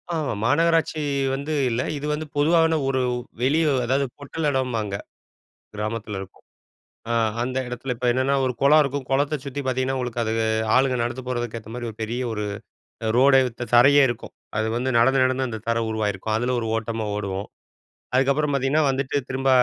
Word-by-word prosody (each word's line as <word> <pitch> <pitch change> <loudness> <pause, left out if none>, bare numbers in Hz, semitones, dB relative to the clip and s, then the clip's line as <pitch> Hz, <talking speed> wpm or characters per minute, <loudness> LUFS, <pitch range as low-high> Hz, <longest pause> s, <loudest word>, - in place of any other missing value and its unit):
ஆமா. 150 -6 -1
மாநகராட்சி 165 +3 +2 0.3
வந்து 145 +3 -4 0.2
இல்ல. 120 +2 0 0.2
இது 145 - -5
வந்து 155 +1 -3
பொதுவான 160 +1 +4
ஒரு 130 -1 +1 0.4
வெளிய 155 +5 +3 0.2
அதாவது, 135 +3 +1
பொட்டல் 150 +2 -3
எடம்பாங்க 115 -7 -1 0.8
கிராமத்தில 105 -1 -4
இருக்கும். 95 -1 -11 0.7
அ - - +1 0.3
அந்த 130 +2 -2
எடத்துல 125 +1 -4
இப்ப 125 +1 -4
என்னன்னா 130 +2 +1
ஒரு 125 - 0
கொளம் 150 +2 +6
இருக்கும். 140 -1 -3
கொளத்தை 145 +3 +1
சுத்தி 140 +1 -4
பாத்தீங்கன்னா, 130 +1 0
உங்களுக்கு 120 -2 -2
அது 110 0 -1 0.4
ஆளுங்க 130 -1 +3
நடந்து 120 +2 -4
போறதுக்கு 120 -2 -3
ஏத்த 110 +1 -12
மாரி 120 -1 -4
ஒரு 110 - -11
பெரிய 120 +3 -3
ஒரு 105 -1 -3 0.7
ரோடே 135 +1 +6 0.2
த 120 - -2
தரையே 140 +4 +7
இருக்கும். 120 -1 -6 0.2
அது 110 - +1
வந்து 130 +2 -1
நடந்து 130 +2 +4
நடந்து 130 0 +1
அந்த 110 -2 -5
தர 115 0 +2
உருவாகியிருக்கும். 110 0 -1
அதுல 125 +2 0
ஒரு 115 - -3
ஓட்டமா 115 -1 -3
ஓடுவோம். 100 -1 -4 0.7
அதுக்கப்புறம் 140 +3 +2
பாத்தீங்கன்னா 140 +3 +2
வந்துட்டு, 135 +1 -2
திரும்ப 135 0 -1
130 Hz, 165 wpm, -23 LUFS, 115-140 Hz, 0.8 s, தரையே